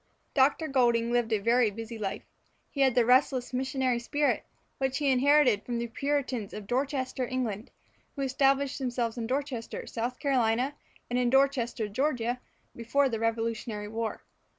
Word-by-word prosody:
Dr. 285 +4 +3
Goulding 235 -4 +2
lived 240 -2 +1
a 230 +2 +3
busy 225 +2 -7
life. 205 0 -3 0.5
He 280 - -2
had 265 -3 +4
the 245 -2 +4
restless 255 0 +3
missionary 260 -1 0
spirit 290 +5 0 0.3
which 265 -1 0
he 285 -2 +2
inherited 260 -4 +4
from 240 -1 -3
the 235 - -2
Puritans 260 -3 -2
of 210 -1 -7
Dorchester, 260 +1 -1
England, 235 -3 -3 0.5
who 280 - -2
established 270 +1 +1
themselves 240 -3 -1
in 225 - -3
Dorchester, 260 -3 -3
South 240 +2 -3
Carolina, 255 -1 +1 0.3
and 245 +1 0
in 245 -1 +2
Dorchester, 260 -4 +2
Georgia, 245 +1 -1 0.3
before 270 +4 +1
the 225 -3 -2
Revolutionary 225 -2 -2
War. 225 0 -4
250 Hz, 150 wpm, -29 LUFS, 230-270 Hz, 0.5 s, had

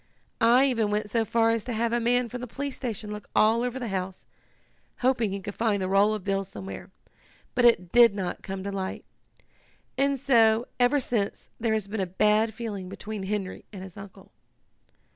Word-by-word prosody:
I 265 - +5
even 230 -6 +1
went 210 0 -2
so 230 0 +2
far 225 +1 +2
as 230 -2 0
to 245 - -3
have 230 +1 0
a 240 - +2
man 245 +1 +2
from 245 +2 -7
the 250 - -5
police 275 +3 -5
station 220 -4 -5
look 210 0 -8
all 225 +2 +4
over 250 +1 -2
the 245 -3 -4
house, 185 -1 -4 0.8
hoping 245 -4 +2
he 195 +1 -3
could 200 +1 -6
find 220 -2 0
the 185 - -1
roll 200 +3 +3
of 210 - -7
bills 195 0 -1
somewhere, 190 0 -8 0.6
but 245 - +2
it 185 -7 +4
did 235 -4 +6
not 185 -3 -3
come 190 -1 -6
to 200 - -4
light. 190 -1 -4 0.9
And 275 0 +2
so, 230 -3 +4
ever 250 +4 +4
since, 225 -6 -2
there 225 -1 +1
has 215 -2 -2
been 205 0 -3
a 190 - -1
bad 210 +4 +2
feeling 205 -5 -5
between 205 +2 -6
Henry 195 -1 -3
and 190 -3 -8
his 190 -2 -11
uncle." 195 -1 -12
215 Hz, 200 wpm, -27 LUFS, 195-235 Hz, 0.9 s, did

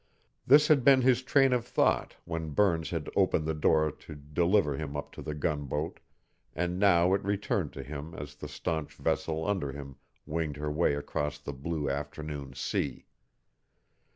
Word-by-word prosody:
This 150 +3 +7
had 145 -5 +4
been 135 0 +7
his 125 -1 +4
train 135 0 +4
of 125 -2 +1
thought 120 - +1
when 80 -1 -4
Burns 85 -6 +2
had 80 -3 -3
opened 80 - +2
the 80 - 0
door 75 0 +3
to 75 - -12
deliver 75 +2 +1
him 75 -1 -4
up 75 - -6
to - - -9
the 75 -1 -5
gunboat, 75 0 -2 0.6
and 90 +2 -1
now 90 -2 +5
it 100 - +1
returned 100 -4 -1
to 70 - -6
him 75 +4 -7
as 75 0 -7
the 75 0 -8
stanch 80 +1 -3
vessel 80 0 -1
under 95 -9 -1
him 70 -1 -9 0.3
winged 75 -2 -2
her 75 0 -3
way 75 -1 +2
across 75 0 -3
the 75 -1 -7
blue 75 +2 -3
afternoon 70 -1 -5
sea. - - -2
80 Hz, 170 wpm, -30 LUFS, 75-90 Hz, 0.6 s, This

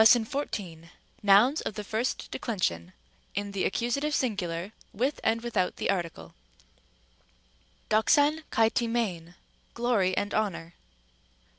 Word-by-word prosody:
814, 220 - +1 0.3
Nouns 210 +9 +5
of - - -4
the 210 - -4
first 225 +5 -2
declension, 95 - -2 0.4
in 200 +1 -2
the 200 -1 -1
accusative 280 +8 0
sin 245 -5 +1
gular, 175 0 -4 0.2
with 260 +8 -1
and 225 +1 +2
without 210 -6 0
the - - 0
article, 165 - -4 1.6
δόξαν 290 +8 +4
καὶ 225 0 +3
τιμήν, 215 -8 -1 0.4
glory 225 -6 +1
and 205 0 -1
honor. 180 -6 -2
215 Hz, 115 wpm, -28 LUFS, 185-240 Hz, 1.6 s, Nouns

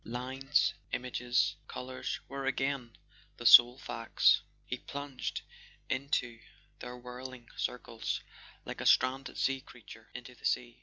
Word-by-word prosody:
Lines, 130 +4 0 0.2
images, 125 0 0
colours 130 0 -5
were 135 0 -4
again 135 -3 -1 0.4
the - - -8
sole 120 +1 +10
facts: 115 -4 +3 0.2
he 125 - -4
plunged 140 -2 -5 0.5
into 130 -4 -1 0.4
their 125 0 -7
whirling 125 0 -9
circles 115 -2 -3 0.4
like - - -6
a - - -4
stranded 130 +1 +3
sea 135 0 +1
creature 115 -3 -14
into 125 0 -8
the 120 - -22
sea. 120 0 0
125 Hz, 120 wpm, -32 LUFS, 120-135 Hz, 0.5 s, sole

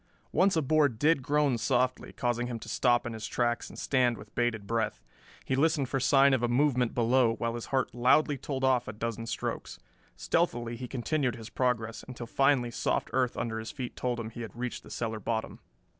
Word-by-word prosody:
Once 195 0 +3
a 160 - +2
board 145 -4 +3
did 150 +3 +3
groan 145 -2 +1
softly, 130 +2 0
causing 120 0 -1
him 120 -2 -4
to - - -10
stop 120 -2 +2
in 120 - -4
his 110 -1 -5
tracks 120 +1 -1
and - - -12
stand 125 -3 +1
with 105 0 -13
bated 120 -4 0
breath. 115 +1 -1 0.5
He 130 - 0
listened 140 -2 +2
for 135 - 0
sign 135 +1 +5
of 130 - +2
a 120 - +2
movement 125 -1 +2
below, 120 0 +3
while 115 0 -2
his 120 -1 -6
heart 135 -1 0
loudly 130 +5 +3
told 135 0 -4
off 130 -2 +3
a 110 - -5
dozen 115 +1 -4
strokes. - - -4 0.4
Stealthily 120 -9 0
he 125 +1 -6
continued 130 +1 -1
his 115 -1 -10
progress, 115 -3 -1
until 125 -2 -7
finally 130 -1 +2
soft - - -1
earth 125 -2 +1
under 110 -1 -2
his 110 - -6
feet 130 -5 -6
told 125 -1 -2
him 110 -1 -5
he 120 - -8
had 115 -3 -7
reached 125 +1 -4
the - - -15
cellar 110 -2 -3
bottom. 110 +1 -3
120 Hz, 205 wpm, -29 LUFS, 115-135 Hz, 0.5 s, sign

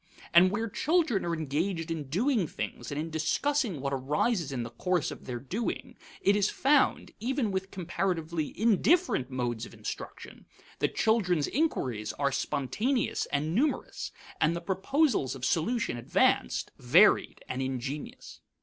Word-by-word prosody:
And 175 +2 +8
where 220 +4 -1
children 295 - +1
are 170 -1 0
engaged 165 +3 -2
in 160 -3 -3
doing 215 - +1
things - - -5
and 145 - -2
in 160 +1 -4
discussing 205 - 0
what 140 0 -2
arises 150 - 0
in 125 -3 -2
the 115 - -7
course 180 +6 0
of - - -10
their 125 -1 -3
doing, 190 - -4 0.3
it 200 - +4
is 205 -1 +2
found, 280 0 +2
even 245 -1 0
with 190 0 -2
comparatively 170 -4 -2
indifferent 230 - +3
modes 120 -3 -2
of - - -14
instruction, - - -8 0.3
that - - 0
children's 180 -9 +2
inquiries 125 - -1
are 140 -1 0
spontaneous 150 - -1
and 150 +3 -1
numerous, 280 - -1 0.3
and 160 +1 +3
the 170 - -4
proposals 195 - +1
of 130 -1 -4
solution 230 - 0
advanced, 120 - +1
varied, - - +4
and 125 - -3
ingenious. 135 +2 -5
170 Hz, 145 wpm, -29 LUFS, 140-225 Hz, 0.3 s, And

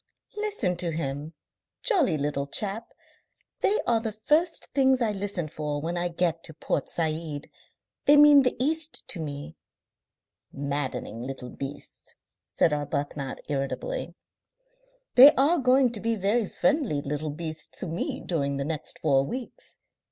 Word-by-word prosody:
"Listen 415 - -1
to 175 -1 -2
him. 150 0 -4 0.5
Jolly 340 - +2
little 140 -1 -2
chap! 210 +7 -1 0.7
They 420 - +2
are 235 -1 +3
the 225 -1 -3
first 300 - 0
things 265 -1 +4
I 230 -3 +1
listen 195 -4 -3
for 150 -1 -3
when 165 +4 -3
I 175 0 0
get 170 -1 -1
to 160 - -9
Port 145 - -2
Said. 155 -2 -2 0.5
They 290 +1 +7
mean 295 -1 +8
the 250 - +1
East 315 +4 +1
to 175 - -4
me." 150 0 -6 0.9
"Maddening 140 -5 -4
little 125 -1 -6
beasts!" 140 +1 -8 0.3
said 155 - +2
Arbuthnot 145 -1 -3
irritably. 145 - -3 1.0
"They 275 +4 +10
are 305 +6 +3
going 255 -1 +4
to 225 - -5
be 230 +2 0
very 210 +2 +1
friendly 265 - 0
little 150 +2 -3
beasts 160 +1 -6
to - - -4
me 165 0 -3
during 140 -5 -1
the 140 - -2
next 155 -1 -4
four 135 -3 +3
weeks.... 255 - -7
170 Hz, 145 wpm, -27 LUFS, -, 1.0 s, They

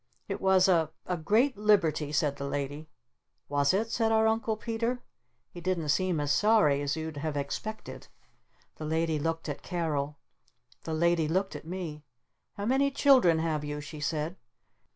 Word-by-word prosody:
"It 195 - -4
was 190 -1 +4
a 165 -4 +3 0.2
a 180 - -1
great 220 - +2
liberty," 170 -8 +2
said 145 -2 +1
the 140 0 -4
Lady. 145 +2 -4 0.6
"Was 145 0 +2
it?" 220 +4 0
said 225 -1 +1
our 220 0 +4
Uncle 220 0 +1
Peter. 230 +2 -2 0.5
He 175 - -9
didn't 170 -4 -1
seem 180 +1 +1
as 145 -1 0
sorry 205 -6 +4
as 145 0 -1
you'd 160 -1 -5
have 150 0 -3
expected. 215 +10 -5 0.7
The 155 - -6
Lady 160 0 0
looked 165 +2 -2
at 145 - -5
Carol. 150 -5 -2 0.7
The 160 - -2
Lady 170 -1 +2
looked 190 +2 -1
at 145 +2 -8
me. 165 -4 -5 0.5
"How 200 - -4
many 270 +4 +3
children 260 - +5
have 160 -2 -1
you?" 145 0 -4
she 150 +1 -8
said. 155 +4 -2
165 Hz, 165 wpm, -29 LUFS, 150-205 Hz, 0.7 s, children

